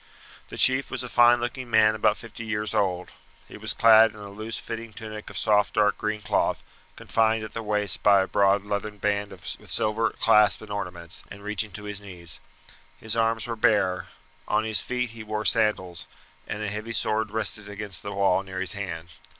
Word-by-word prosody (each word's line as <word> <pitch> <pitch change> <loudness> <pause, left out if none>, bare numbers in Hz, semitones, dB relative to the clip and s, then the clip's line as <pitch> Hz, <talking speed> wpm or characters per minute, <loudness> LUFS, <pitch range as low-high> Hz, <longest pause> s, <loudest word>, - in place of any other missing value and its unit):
The - - -9
chief 130 +1 +3
was 130 -1 -3
a 125 - -6
fine 120 0 +5
looking 120 +1 -4
man 110 -1 +5
about 110 -1 +2
fifty 115 0 -9
years 105 -1 -2
old. 90 -2 0 0.4
He - - -12
was - - -2
clad 115 0 +7
in - - -14
a 100 -1 -9
loose 110 +2 -5
fitting 115 -1 -7
tunic 110 -1 -8
of - - -8
soft 105 -2 +2
dark 105 -1 +3
green 105 0 -2
cloth, 105 0 0 0.3
confined 110 0 +1
at 110 - -8
the 115 - -4
waist 105 -1 -1
by 100 -2 +5
a - - -5
broad 100 0 +2
leathern 105 +1 -3
band 100 0 -1
with 95 -3 -13 0.2
silver 110 +1 +1
clasp 105 -2 +4
and 105 - -10
ornaments, 90 -4 -5
and 100 0 -11
reaching 105 0 -2
to 105 - -7
his 105 -1 -5
knees. 90 -4 -7 0.6
His 110 0 -2
arms 115 -1 +1
were 120 -1 -3
bare; 105 -6 +2 0.4
on 110 - +1
his 110 -3 0
feet 125 -2 -2
he 115 0 -10
wore 110 0 -3
sandals, 95 -5 +1 0.4
and 105 +1 -4
a - - -2
heavy 105 +2 -5
sword 110 -1 0
rested 105 -1 -2
against 100 -1 -3
the 100 - -6
wall 100 -1 +2
near 95 -1 -7
his 95 -1 0
hand. 90 -5 -5
105 Hz, 200 wpm, -26 LUFS, 100-110 Hz, 0.6 s, clad